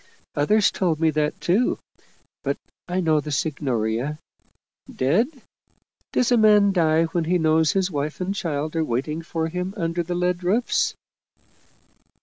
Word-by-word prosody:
Others 205 +9 +3
told 170 -5 0
me 160 -1 +3
that, 150 0 -1
too 205 +8 +1 0.7
but - - -1 0.3
I 180 +1 -1
know 160 -3 +3
the 150 - -6
Signoria. 135 -3 -1 0.7
Dead? 165 - +2 0.8
Does 250 -1 +1
a 245 - +5
man 210 -2 +5
die 165 -3 +3
when 165 0 -1
he 180 +2 +2
knows 160 -1 +3
his 190 -1 0
wife 150 0 -3
and 185 +2 -1
child 155 -4 -3
are 165 - +1
waiting 150 +5 -2
for 165 -1 -3
him 180 +3 -4
under 165 -1 -1
the 175 +1 -3
lead 180 0 0
roofs?" 215 +7 +1
165 Hz, 145 wpm, -23 LUFS, 150-185 Hz, 0.8 s, a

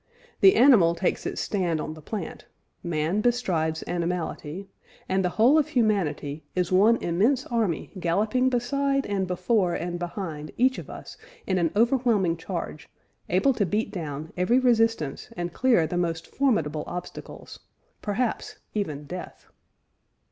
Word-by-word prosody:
The 385 - +7
animal 220 -11 +6
takes 175 +2 -1
its - - -3
stand 175 -6 -1
on 155 - -4
the 155 - -12
plant, 200 +3 -6 0.3
man 170 +4 -1
bestrides 175 -10 0
animality, 175 0 -3 0.4
and 190 0 +1
the 180 - +1
whole 255 +8 +6
of 300 - +1
humanity... 185 - 0
is 180 -1 0
one 205 +5 +5
immense 215 +11 +2
army 220 -9 -1
galloping 215 +9 +1
beside 275 +3 0
and 195 -2 -1
before 180 0 +1
and 175 +1 -3
behind 170 -4 -5
each 260 +2 +3
of - - -10
us - - -9 0.3
in 185 -1 +1
an 170 -2 +2
overwhelming 230 -6 +2
charge, 165 -3 -6 0.4
able 190 +10 +3
to 225 - 0
beat 210 +4 -1
down 155 -4 -6
every 180 +8 +2
resistance 225 - +1
and 175 -1 -3
clear 245 -10 +3
the 175 - -3
most 165 -2 -1
formidable 165 - 0
obstacles, 180 0 -8 0.4
perhaps 220 +3 -2 0.2
even 155 -9 -3
death." 180 +5 -8
185 Hz, 140 wpm, -26 LUFS, 165-230 Hz, 0.4 s, The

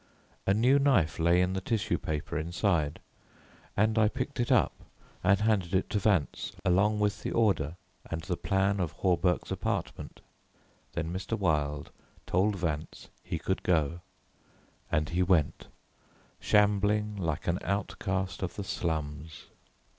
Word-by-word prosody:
A 95 - +5
new 125 +6 +4
knife 120 - +2
lay 85 +2 +4
in 90 +1 +1
the 95 - -2
tissue 110 +2 -1
paper 75 -1 -4
inside 80 -1 0 0.8
and 110 +2 +3
I 110 - +5
picked 140 +4 -4
it 120 - 0
up - - +4 0.5
and 95 +1 +4
handed 100 -5 +1
it 95 - 0
to 105 - +1
Vance, 100 -7 0
along 100 +4 +3
with 105 -1 0
the - - -3
order 95 -9 +1 0.3
and 80 0 -3
the 90 0 -2
plan 95 +2 +1
of 85 -4 -1
Hawberk's 90 -1 +1
apartment. - - -3 0.7
Then 85 0 -3
Mr. 95 +4 -3
Wilde 75 -6 0 0.3
told 100 +4 +2
Vance 80 -4 -4
he - - -3
could 95 +4 -2
go; 85 -1 +1 0.9
and 75 0 +1
he 90 +2 0
went, 90 -5 +1 0.7
shambling 105 0 +2
like 85 -5 -2
an 85 +1 +1
outcast 95 -1 -2
of 95 - -3
the 100 - -4
slums. 80 -3 -4
95 Hz, 140 wpm, -29 LUFS, 80-105 Hz, 0.9 s, A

